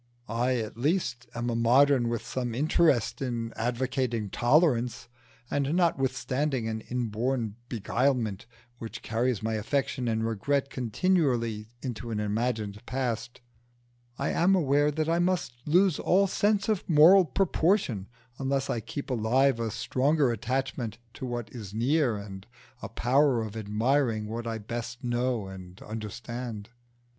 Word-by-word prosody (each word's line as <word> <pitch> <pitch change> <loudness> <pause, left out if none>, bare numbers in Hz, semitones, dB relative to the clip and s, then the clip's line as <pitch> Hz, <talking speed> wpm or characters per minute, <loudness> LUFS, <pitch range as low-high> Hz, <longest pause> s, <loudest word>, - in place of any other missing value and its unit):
I 120 +3 0
at 110 -1 -4
least 125 -5 0
am 120 0 -1
a - - -1
modern 125 +2 +4
with 115 -2 -3
some 120 -3 -3
interest 145 -3 +2
in 115 -3 -3
advocating 120 -2 -1
tolerance, 125 -3 +2 0.4
and 145 +2 0
notwithstanding 135 -5 0
an 110 0 -3
inborn 120 -1 -1
beguilement 115 -2 0 0.3
which 115 -1 -7
carries 115 -1 0
my 110 0 -1
affection 125 +3 -1
and 110 -1 0
regret 135 +6 0
continually 120 - 0
into 120 -2 -5
an 110 -2 -2
imagined 105 -1 -2
past, 120 -2 -3 0.8
I - - -1
am 190 +3 +3
aware 145 -3 +3
that 155 +1 -1
I 165 +1 +2
must 175 -7 0
lose 180 +1 +4
all 195 +2 +3
sense 200 +1 +1
of 215 -5 -1
moral 170 +5 +8
proportion 165 - +1 0.3
unless 135 0 0
I 115 - -1
keep 140 +5 -6
alive 125 +2 +2
a 115 -1 -1
stronger 130 +5 +1
attachment 120 0 -2 0.2
to 130 - -6
what 120 -3 -5
is 105 -5 -8
near, 130 +1 +2
and 100 -1 -9 0.3
a 110 - -6
power 125 +2 +2
of 110 -1 -7
admiring 110 +2 0
what 115 +2 -5
I 115 -1 -2
best 120 +3 -6
know 120 -2 0
and 95 -1 -10
understand. 110 +1 -6
120 Hz, 135 wpm, -28 LUFS, 110-140 Hz, 0.8 s, moral